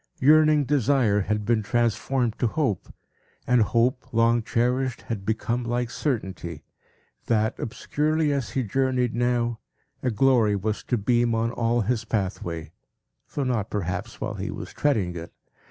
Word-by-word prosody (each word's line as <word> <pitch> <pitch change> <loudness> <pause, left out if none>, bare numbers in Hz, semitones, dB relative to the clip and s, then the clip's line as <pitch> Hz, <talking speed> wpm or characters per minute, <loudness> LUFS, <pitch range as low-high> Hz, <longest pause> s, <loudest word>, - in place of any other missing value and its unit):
Yearning 155 +1 +5
desire 130 -6 +2
had 105 +1 -1
been 115 -1 +2
transformed 120 +2 0
to 120 - +2
hope; 115 - -1 0.5
and 125 -1 +4
hope, 120 +4 +1
long 115 +1 +3
cherished, 125 +1 0
had 110 -4 -4
become 115 +2 -1
like 120 0 -1
certainty, 95 - -3 0.6
that, 110 -1 +2
obscurely 150 +5 0
as 135 -4 -2
he 130 - -1
journeyed 125 +1 0
now, 120 -1 0 0.4
a 130 - 0
glory 115 -2 +3
was 105 +2 -2
to 125 - 0
beam 120 +2 +2
on 115 +1 0
all 120 0 +1
his 115 +2 0
pathway, 90 -7 -3 0.6
though 145 - 0
not, 120 -6 -1
perhaps, 90 -3 -4
while - - -3
he - - -4
was - - -7
treading 105 -12 +1
it. 85 0 -7
120 Hz, 145 wpm, -25 LUFS, 105-130 Hz, 0.6 s, Yearning